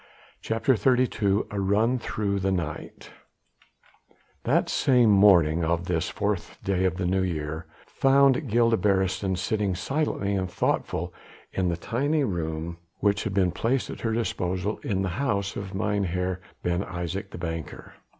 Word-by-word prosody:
CHAPTER 115 +4 +1
XXXII 110 -5 +2
A 100 - -2
RUN 110 +6 +2
THROUGH 100 -4 -2
THE 95 0 0
NIGHT 85 -5 -4 1.3
That - - +2
same 125 -5 +4
morning 90 -5 +5
of 85 +1 0
this 85 -2 -1
fourth 100 -3 -2
day 95 -1 +1
of 90 -1 0
the 95 - -1
New 95 +2 +1
Year 80 -3 -3 0.2
found 135 0 +3
Gilda 115 +1 +3
Beresteyn 95 0 +1
sitting 100 0 0
silent 140 - -1
and 100 -2 0
thoughtful 90 0 -1 0.4
in 95 -2 0
the 85 - -1
tiny 140 - 0
room 85 -5 -3 0.2
which 100 +1 +1
had 100 -3 -2
been 95 -3 +3
placed 125 +7 -1
at - - -8
her 115 - 0
disposal 95 -3 -1
in 95 -3 -1
the 95 - -1
house 100 -7 -1
of 100 -1 -6
Mynheer 95 -2 -1 0.2
Ben 90 +1 0
Isaje, 90 0 -4
the - - -9
banker. 80 -2 -6
95 Hz, 150 wpm, -26 LUFS, 90-110 Hz, 1.3 s, morning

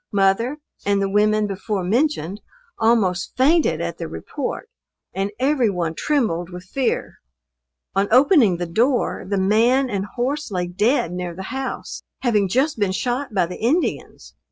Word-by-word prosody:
Mother 205 +8 +2 0.3
and 200 0 +1
the 195 - +1
women 210 +1 +3
before 200 0 -3
mentioned, 210 - 0 0.4
almost 215 -6 +1
fainted 305 +6 +3
at - - -4
the - - -4
report, - - -5 0.5
and 195 +1 -1
every 265 -3 +2
one 175 -4 -2
trembled 180 - 0
with 180 0 -9
fear. 250 +7 -2 0.7
On 195 +1 +1
opening 250 - +5
the 175 - -2
door, 235 +10 +1
the 200 - 0
man 235 +7 +3
and 200 0 -2
horse 270 +7 -2
lay 180 -3 -1
dead 195 - +1
near 180 -1 -4
the 190 - -6
house, 265 0 -5 0.2
having 210 -6 +2
just 265 - +1
been 200 -2 +1
shot 250 +6 -2
by 185 - +3
the 180 +1 -8
Indians. 290 +11 -1
210 Hz, 155 wpm, -21 LUFS, 190-260 Hz, 0.7 s, opening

